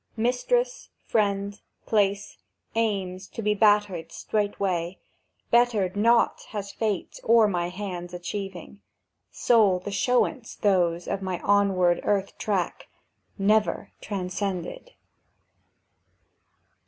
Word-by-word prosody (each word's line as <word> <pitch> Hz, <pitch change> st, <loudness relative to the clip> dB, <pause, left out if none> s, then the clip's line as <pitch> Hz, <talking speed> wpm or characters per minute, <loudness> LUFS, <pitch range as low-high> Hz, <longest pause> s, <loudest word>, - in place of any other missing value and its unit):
Mistress, 485 Hz, -, 0 dB, 0.2 s
friend, 200 Hz, -1 st, 0 dB, 0.2 s
place, 200 Hz, -2 st, 0 dB, 0.3 s
aims 195 Hz, -4 st, -1 dB
to 225 Hz, -, -7 dB
be 210 Hz, 0 st, +2 dB
bettered 205 Hz, -5 st, +2 dB
straightway, 195 Hz, -4 st, -2 dB, 0.5 s
Bettered 225 Hz, -6 st, +3 dB
not 230 Hz, +3 st, +3 dB
has 200 Hz, -2 st, -5 dB
Fate 210 Hz, -4 st, -3 dB
or 225 Hz, -1 st, +5 dB
my 175 Hz, -3 st, -1 dB
hand's 180 Hz, -2 st, -6 dB
achieving; 195 Hz, +2 st, -6 dB, 0.5 s
Sole 215 Hz, -6 st, +3 dB
the 185 Hz, +3 st, -6 dB
showance 245 Hz, +4 st, 0 dB
those 175 Hz, -4 st, +2 dB
of 195 Hz, -, -2 dB
my 185 Hz, -2 st, -3 dB
onward 195 Hz, -3 st, +3 dB
earth 200 Hz, -1 st, 0 dB
track— 190 Hz, -5 st, -2 dB, 0.5 s
Never 210 Hz, +2 st, +1 dB
transcended! 190 Hz, -, -4 dB
200 Hz, 95 wpm, -26 LUFS, 185-215 Hz, 0.5 s, or